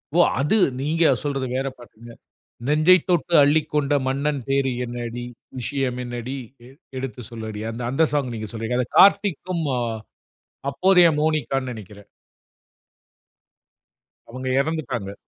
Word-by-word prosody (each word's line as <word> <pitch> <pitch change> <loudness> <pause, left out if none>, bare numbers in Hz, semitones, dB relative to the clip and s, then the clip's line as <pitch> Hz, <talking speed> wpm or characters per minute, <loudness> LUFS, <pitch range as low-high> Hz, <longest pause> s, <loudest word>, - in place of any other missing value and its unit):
ஓ! - - +4 0.2
அது 150 +11 +2 0.2
நீங்க 165 +3 +1 0.2
சொல்றது 135 -3 -2
வேற 135 +1 -1
பாட்டுங்க. 120 -1 -14 0.6
"நெஞ்சைத் 155 +4 +4
தொட்டு 175 0 +1
அள்ளிக்கொண்ட 150 0 +1
மன்னன் 140 +2 -1
பேர் 135 -1 +2 0.2
என்னடி, 120 0 -5 0.4
விஷயம் 130 0 -2
என்னடி 120 +2 -5 0.3
எ - - -14 0.3
எடுத்து 130 -2 -6
சொல்லடி." 110 -2 -6
அந்த 115 +2 -7
அந்த 135 +6 +3
சாங் 140 -4 0
நீங்க 110 -1 -6
சொல்றீங்க. 115 +2 -3
அதை 125 - -1
கார்த்திக்கும், 185 -3 +4 0.2
அ - - -1 0.9
அப்போதைய 180 +3 +5
மோனிகான்னு 135 -4 0
நெனைக்கிறேன். 105 -3 -11 2.2
அவுங்க 130 +2 -6
எறந்துட்டாங்க. 135 -10 -4
135 Hz, 120 wpm, -23 LUFS, 120-155 Hz, 2.2 s, அப்போதைய